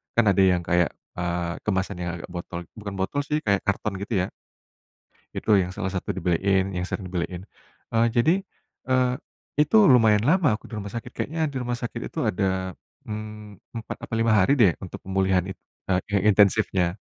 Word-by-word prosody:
kan 120 - +5
ada 95 - 0
yang 90 -2 +4
kayak, 85 -2 +1 0.2
eee, 85 -1 -1
kemasan 95 -1 0
yang 85 -1 -2
agak - - -10
botol 85 0 -6 0.2
bukan 100 -1 -6
botol 95 +9 -1
sih, 150 +2 -1
kayak 100 -2 +2
karton, 100 -1 -1
gitu, 105 +2 -3
ya. - - -10 1.1
Itu - - -3
yang 90 +1 -4
salah 100 -3 -2
satu 95 - -2
dibeliin, 95 +2 +1
yang 90 - -1
sering 95 -2 -4
dibeliin. 90 0 -3 0.5
Eee, 115 +1 +4
jadi, 130 +8 +5 0.6
eee, 130 -1 +3 0.5
itu 150 +9 +4
lumayan 110 -5 +5
lama 175 -3 +4
aku - - -24
di 115 - -8
rumah 100 -1 -6
sakit. 115 - -6
Kayaknya 160 +2 -3
di - - -7
rumah 120 0 -2
sakit 120 - -4
itu - - -9
ada, 95 +2 0 0.6
mmm, 105 -1 -7 0.2
4, - - -7
apa - - -5
5 115 -1 +3
hari 95 +8 +4
deh 95 -6 +6
untuk 90 - -8
pemulihan 95 -1 +2
in 95 - -6 0.3
eee, 95 +1 +1
intensifnya, 100 -3 +3
100 Hz, 180 wpm, -25 LUFS, 90-115 Hz, 1.1 s, deh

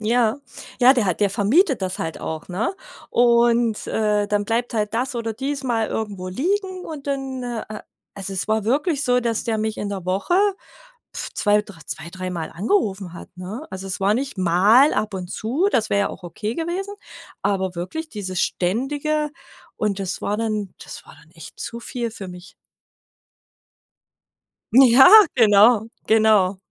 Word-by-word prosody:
Ja. 230 +1 +2 0.4
Ja, 250 +1 +8
der 245 -5 +1
hat 180 - -1
der 205 -1 +3
vermietet 260 - +2
das 185 0 -3
halt 160 0 -4
auch, 160 -1 -5
ne? 200 - -2 0.4
Und 235 -2 +3
äh, 210 -1 0
dann 205 -1 0
bleibt 230 +2 -1
halt 210 -1 -1
das 250 +3 -1
oder 230 -1 -3
dies 270 +4 -4
mal 230 -3 0
irgendwo 200 -4 -4
liegen 370 - -2
und 290 -3 -8
dann, 270 -2 -3
ah, 240 -2 -4
äh 215 - -7 0.4
also 195 0 -5
es 190 +2 -3
war 220 -1 +1
wirklich 290 - 0
so, 250 0 +3
dass 230 -2 -2
der 225 -2 -1
mich 220 0 -2
in 205 - -4
der 190 -3 -6
Woche 195 - 0 0.8
2, 210 0 0
dr 200 -5 -14
zwei, 165 - -6
dreimal 180 -3 -5
angerufen 195 - -1
hat, - - -10
ne? 200 - -7
Also 190 0 -7
es 190 - -4
war 200 +2 +3
nicht 265 -2 -3
mal 200 - +5
ab 215 -1 -1
und 180 -2 -5
zu, 275 - 0
das 220 -3 +1
wär 200 - +2
ja 200 - +1
auch - - -11
okay 210 +6 -4
gewesen, 360 +6 -3 0.5
aber 190 -2 -1
wirklich 185 - -5
dieses 190 -4 -4
Ständige 290 - -1 0.5
und 210 -2 -1
das 195 -1 -4
war 205 - -1
dann 215 -4 -2
das - - -10
war - - -14
dann - - -22
echt - - -12
zu 235 - -5
viel 235 0 -4
für 205 -3 -6
mich. 180 +1 -12 2.2
Ja, 260 0 +8 0.3
genau, 220 -1 +5 0.2
genau. 215 -4 +4
220 Hz, 170 wpm, -22 LUFS, 195-250 Hz, 2.2 s, Ja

